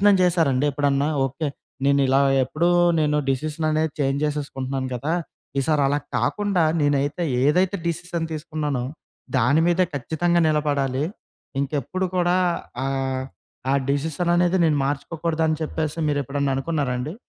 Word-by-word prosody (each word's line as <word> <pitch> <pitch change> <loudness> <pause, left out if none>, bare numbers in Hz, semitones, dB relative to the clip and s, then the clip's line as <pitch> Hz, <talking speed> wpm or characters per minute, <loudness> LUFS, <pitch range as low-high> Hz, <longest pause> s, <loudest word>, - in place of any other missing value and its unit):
ప్రయత్నం 205 - +7
చేశారండి? 160 -7 +2
ఎప్పుడన్నా 140 0 +1 0.2
ఓకే, 135 +4 -2 0.4
నేనిలా 140 -1 +4 0.2
ఎప్పుడూ 160 +7 0 0.3
నేను 150 -1 +2
డిసిషననేది 155 +2 0
చేంజ్ 140 0 +1
చేసేసుకుంటున్నాను 135 -3 -3
కదా, 140 +7 -2 0.5
ఈసారి 150 +1 +2
అలా 145 +2 +1 0.2
కాకుండా 200 -4 +1 0.2
నేనైతే 145 +3 +1 0.2
ఏదైతే 180 +7 +3
డిసిషన్ 170 0 -2
తీసుకున్నానో, 150 -4 -3 0.5
దాని 130 +6 +4
మీద 175 +1 +2
ఖచ్చితంగా 160 +5 +1
నిలబడాలి. 145 -3 0 0.6
ఇంకెప్పుడు 150 +7 -2
కూడా 175 0 +3 0.5
ఆహ్, 135 -1 -1 0.5
ఆ - - +3 0.2
డిసిషననేది 175 +5 +1
నేను 155 -3 +3
మార్చుకోకూడదని 160 +2 -1
చెప్పేసి 155 0 -3
మీరెప్పుడైనా 140 -1 -1
అనుకున్నారా 140 -2 -1
అండి? 150 +7 -4
150 Hz, 115 wpm, -23 LUFS, 140-165 Hz, 0.6 s, ప్రయత్నం